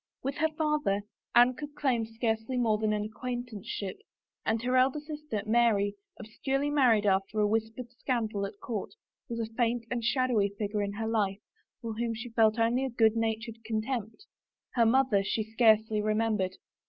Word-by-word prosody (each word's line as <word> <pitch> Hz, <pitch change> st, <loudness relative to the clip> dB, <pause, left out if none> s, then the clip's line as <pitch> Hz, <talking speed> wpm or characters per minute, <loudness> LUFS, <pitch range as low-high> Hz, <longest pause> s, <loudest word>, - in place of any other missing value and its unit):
With 275 Hz, +1 st, -2 dB
her 315 Hz, 0 st, +2 dB
father 300 Hz, -11 st, +1 dB, 0.3 s
Anne 245 Hz, +1 st, +7 dB
could 295 Hz, +2 st, -8 dB
claim 245 Hz, -6 st, 0 dB
scarcely 225 Hz, +2 st, -2 dB
more 220 Hz, -3 st, +2 dB
than 215 Hz, -1 st, +1 dB
an 210 Hz, -1 st, 0 dB
acquaintanceship, 235 Hz, -, -5 dB, 0.4 s
and 225 Hz, +1 st, +1 dB
her 250 Hz, +1 st, +1 dB
elder 260 Hz, +3 st, +3 dB
sister, 295 Hz, -8 st, -5 dB
Mary, 215 Hz, -3 st, +3 dB, 0.3 s
obscurely 270 Hz, +6 st, -2 dB
married 245 Hz, -8 st, +4 dB
after 195 Hz, +2 st, +1 dB
a 210 Hz, -, +4 dB
whispered 225 Hz, +3 st, -2 dB
scandal 225 Hz, -5 st, -2 dB
at 200 Hz, -, -13 dB
court, 220 Hz, -, -5 dB, 0.3 s
was 230 Hz, -1 st, -3 dB
a 225 Hz, -, 0 dB
faint 235 Hz, 0 st, 0 dB
and 240 Hz, -2 st, -1 dB
shadowy 240 Hz, -4 st, +2 dB
figure 210 Hz, 0 st, -1 dB
in 200 Hz, 0 st, -2 dB
her 220 Hz, +2 st, -3 dB
life 205 Hz, -4 st, 0 dB, 0.4 s
for 230 Hz, -1 st, -4 dB
whom 230 Hz, +1 st, -2 dB
she 240 Hz, +2 st, -6 dB
felt 225 Hz, -1 st, +3 dB
only 235 Hz, +3 st, +2 dB
a 265 Hz, -, -1 dB
good 225 Hz, -2 st, +3 dB
natured 225 Hz, 0 st, -2 dB
contempt. 225 Hz, -, -3 dB, 0.5 s
Her 230 Hz, -2 st, +4 dB
mother 235 Hz, -5 st, +3 dB
she 215 Hz, +3 st, -1 dB
scarcely 220 Hz, -1 st, +3 dB
remembered. 215 Hz, -3 st, 0 dB
225 Hz, 165 wpm, -29 LUFS, 215-250 Hz, 0.5 s, Anne